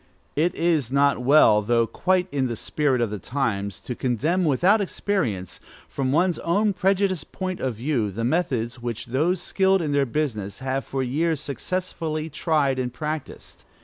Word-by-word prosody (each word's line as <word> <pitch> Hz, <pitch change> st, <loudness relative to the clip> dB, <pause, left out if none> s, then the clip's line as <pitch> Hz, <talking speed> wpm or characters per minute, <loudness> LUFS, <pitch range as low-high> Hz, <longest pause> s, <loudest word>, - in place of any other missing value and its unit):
It 165 Hz, +4 st, +1 dB
is 160 Hz, -8 st, +1 dB
not 140 Hz, 0 st, +3 dB
well, 125 Hz, -5 st, +6 dB
though 115 Hz, +2 st, +2 dB
quite 185 Hz, +8 st, 0 dB
in 135 Hz, -2 st, 0 dB
the 120 Hz, -, -3 dB
spirit 135 Hz, +1 st, 0 dB
of 115 Hz, -3 st, 0 dB
the 105 Hz, -, -4 dB
times, 100 Hz, -4 st, -2 dB
to 125 Hz, -, -5 dB
condemn 150 Hz, -, 0 dB
without 180 Hz, +9 st, +3 dB
experience, 150 Hz, -, -2 dB, 0.3 s
from 130 Hz, -2 st, -2 dB
one's 175 Hz, +4 st, +2 dB
own 200 Hz, +5 st, +1 dB
prejudiced 190 Hz, -2 st, 0 dB
point 185 Hz, -1 st, -4 dB
of 130 Hz, -3 st, -2 dB
view, 120 Hz, -2 st, -1 dB
the 110 Hz, +4 st, -4 dB
methods 125 Hz, -5 st, -1 dB
which 115 Hz, -1 st, -4 dB
those 155 Hz, +9 st, 0 dB
skilled 190 Hz, 0 st, +2 dB
in 155 Hz, -4 st, -2 dB
their 140 Hz, -1 st, +2 dB
business 110 Hz, -8 st, -2 dB
have 135 Hz, +1 st, -2 dB
for 135 Hz, -1 st, -2 dB
years 155 Hz, +5 st, 0 dB
successfully 160 Hz, +1 st, -3 dB
tried 145 Hz, -4 st, +1 dB
and 125 Hz, -1 st, -2 dB
practised. 155 Hz, +2 st, -6 dB
140 Hz, 165 wpm, -24 LUFS, 120-170 Hz, 0.3 s, well